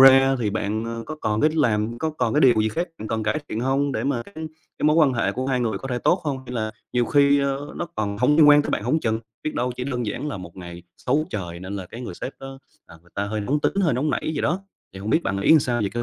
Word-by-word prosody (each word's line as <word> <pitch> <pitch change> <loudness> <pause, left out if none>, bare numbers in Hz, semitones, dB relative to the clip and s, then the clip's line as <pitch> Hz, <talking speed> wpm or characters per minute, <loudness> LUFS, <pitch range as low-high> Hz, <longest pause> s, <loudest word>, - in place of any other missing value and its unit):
ra 135 0 +8
thì 110 -4 0
bạn, 110 +1 -2
ơ, 115 0 -4
có 155 - -5
còn 105 0 0
cái 155 - +4
làm 115 -6 +1
có 160 - -1
còn 125 -7 -1
cái 150 - +4
điều 130 -4 +6
gì 110 - +1
khác 170 - -2
bạn 110 - -6
cần 110 0 -1
cải 110 +7 0
thiện 110 - -3
hông, 135 +3 +1
để - - -2
mà 135 -4 0
cái 200 - -17 0.4
cái - - -2
mối 150 +1 +4
quan 150 -5 +5
hệ 115 -4 0
của 130 +4 -3
hai 130 -2 +1
người 110 -5 -1
có 135 - -7
thể 125 -1 -1
tốt 175 - +3
không, 140 -3 -1
hay 125 - -7
là 110 -2 -1 0.2
nhiều 125 -1 +2
khi, 140 +1 +4
ơ, 140 +1 -2
nó 175 - -3
còn 100 -1 -2
hông 145 +5 +4
liên 155 -2 +7
quan 145 0 +7
tới - - -4
bạn - - -1
hổng 160 - +1
chừng. 110 -3 0 0.2
Biết 155 - -3
đâu 125 +1 -1
chỉ 125 - -3
đơn 125 -4 -2
giản 130 +8 -3
là 140 - -4
một 90 -1 -10
ngày 85 -1 -9
xấu 145 +5 0
trời 85 -4 -5
nên 95 +2 -5
là 95 -2 -6
cái 115 - -9
người 120 -8 -6
sếp 130 - -5
đó 135 0 -8 0.3
là - - -13
người 85 +2 -24
ta 100 - -1
hơi 110 +1 -2
nóng 140 +8 0
tính, - - +1
hơi 165 -9 +2
nóng 145 +5 0
nảy 155 - -1
gì 145 - -1
đó. 175 +6 0 0.3
Thì 95 - -9
hông 105 +3 -3
biết 160 - +3
bạn 100 -7 -1
nghĩ 160 +10 +6
sao 120 -3 0
về 100 - +1
cái 120 +3 -3
125 Hz, 305 wpm, -23 LUFS, 110-145 Hz, 0.4 s, ra